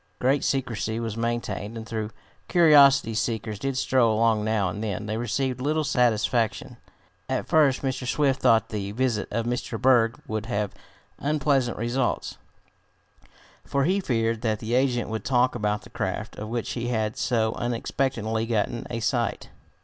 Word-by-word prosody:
Great 135 +3 +1
secrecy 115 -4 -1
was 115 -2 -3
maintained, 115 -2 -3
and 110 - -7
though 110 -2 -3 0.4
curiosity 140 -8 +6
seekers 110 -2 -2
did 135 +1 -2
stroll 120 -5 +2
along 110 -2 +2
now 110 -3 +1
and 105 +4 -4
then, 105 -1 -3
they 110 +1 -3
received 125 +2 -2
little 155 +3 +1
satisfaction. 120 -4 +1 0.5
At - - -1
first 145 -5 +3
Mr. 130 -1 -2
Swift 135 0 +1
thought 115 0 +4
that 110 - -6
the 100 -1 -3
visit 120 -3 0
of 115 -1 -2
Mr. 120 -2 -3
Berg 120 -2 +3
would 110 -2 -3
have 105 -3 -2 0.5
unpleasant 140 -3 +1
results, 120 +2 -1 1.2
for 140 0 0
he 185 +7 +2
feared 115 - 0
that 110 -2 0
the 110 +3 -4
agent 125 -1 +2
would 110 -2 -3
talk 125 -1 +2
about 105 -2 -1
the - - -15
craft, - - -4
of 105 +1 -6
which 120 -1 -3
he 120 -1 -3
had 110 -3 -1
so 110 -3 0
unexpectedly 115 -2 -2
gotten 115 +1 -1
a 115 -1 -3
sight. 115 0 -1
115 Hz, 160 wpm, -25 LUFS, 110-130 Hz, 1.2 s, curiosity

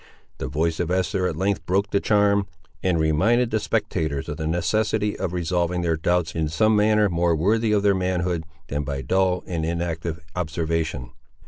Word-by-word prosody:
The 65 - -3
voice 80 +4 -1
of 85 - -1
Esther 90 0 0
at - - -3
length 95 -3 0
broke 100 +2 +1
the 100 - +3
charm, 100 -1 +2 0.3
and 90 -3 +1
reminded 110 +11 +2
the 110 - +1
spectators 80 -9 -1
of 75 - -4
the 80 -1 -3
necessity 105 +5 0
of 95 - -2
resolving 90 0 -1
their 85 -1 +1
doubts 85 0 0
in 80 -1 -1
some 110 +7 +3
manner 105 0 +4
more 85 -2 +1
worthy 110 +7 +2
of 105 -1 +2
their 100 -1 +4
manhood, 90 -2 -1 0.2
than 75 +1 -2
by 70 -1 -4
dull 95 0 +1
and 85 -3 -3
inactive 85 0 -2 0.2
observation. 80 -5 -2
90 Hz, 180 wpm, -23 LUFS, 80-100 Hz, 0.3 s, manner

